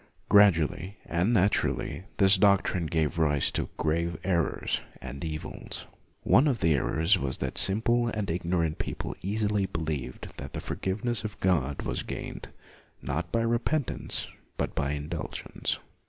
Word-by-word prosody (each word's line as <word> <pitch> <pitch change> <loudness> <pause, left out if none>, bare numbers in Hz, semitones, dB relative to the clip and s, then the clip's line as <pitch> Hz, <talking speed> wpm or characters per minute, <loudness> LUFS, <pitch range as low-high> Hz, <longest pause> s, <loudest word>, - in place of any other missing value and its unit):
Gradually 95 -1 +4
and 85 +7 +1
naturally, 100 -3 +1
this 95 0 +6
doctrine 95 -3 +3
gave 80 0 0
rise 75 -3 +3
to - - -2
grave 85 +2 0
errors 85 -4 0 0.2
and 70 - -7
evils. 80 -1 -6 0.4
One 140 - +5
of 130 -6 +1
the 80 -3 +3
errors 80 +7 +2
was 65 -4 -1
that - - -3
simple 120 +4 +4
and 105 -6 -2
ignorant 85 -2 -1
people - - -4
easily 105 0 0
believed 75 -7 -4
that - - -7
the - - -3
forgiveness 115 +5 -2
of 105 -2 -6
God 75 -7 +1
was - - -2
gained, - - -6 0.6
not 80 +6 -3
by 115 - +2
repentance, 120 +4 0 0.3
but - - -2
by 70 0 -1
indulgence. 75 +3 -3
90 Hz, 140 wpm, -28 LUFS, 80-105 Hz, 0.6 s, this